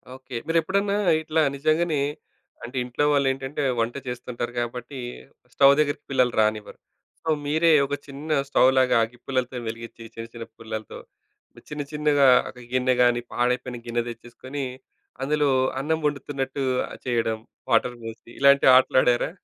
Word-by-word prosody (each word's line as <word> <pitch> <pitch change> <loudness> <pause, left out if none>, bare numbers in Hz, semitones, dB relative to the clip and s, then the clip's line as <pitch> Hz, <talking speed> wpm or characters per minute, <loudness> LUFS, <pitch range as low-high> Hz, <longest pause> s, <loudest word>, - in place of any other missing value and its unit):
Okay. 130 -2 -10
మీరు 165 - +2
ఎప్పుడన్నా 200 +2 0 0.2
ఇట్లా 160 0 0
నిజంగానే, 155 +2 +1 0.6
అంటే 125 +3 -7
ఇంట్లో 125 +3 -2
వాళ్ళు 140 -1 +2
ఏంటంటే, 135 +2 -4 0.2
వంట 115 +1 -1
చేస్తుంటారు 120 -1 -5
కాబట్టి. 125 +3 -5 0.5
స్టవ్ 140 0 +6
దగ్గరికి 145 -1 0
పిల్లలు 125 -2 +2
రానివ్వరు. 110 -1 -1 0.4
సో 160 - -3 0.2
మీరే 160 +3 +3
ఒక 145 - -2
చిన్న 140 +3 -9 0.2
స్టవ్‌లాగా 130 -2 +4
అగిప్పులలతో 125 +2 -4
వెలిగించి, 115 +1 -7
చిన్న, 115 - -6
చిన్న 115 - -6
పుల్లలతో 110 -1 -7 0.7
చిన్న, 150 -1 -4
చిన్నగా 150 -2 +3 0.2
ఒక 125 - -12
గిన్నె 130 0 +2
గాని, 120 -1 +3
పాడైపోయిన 125 0 -1
గిన్నె 120 0 0
తెచ్చేసుకొని, 125 +4 -7 0.6
అందులో 150 0 +1 0.3
అన్నం 160 +3 0
వండుతున్నట్టు 140 -2 -2 0.4
చేయడం 115 -3 0 0.3
వాటర్ 120 +1 +2
బోసి 115 +1 -9
ఇలాంటి 140 0 +5
ఆటలు 130 0 +5
ఆడారా? 120 -1 +2
130 Hz, 135 wpm, -24 LUFS, 120-145 Hz, 0.7 s, స్టవ్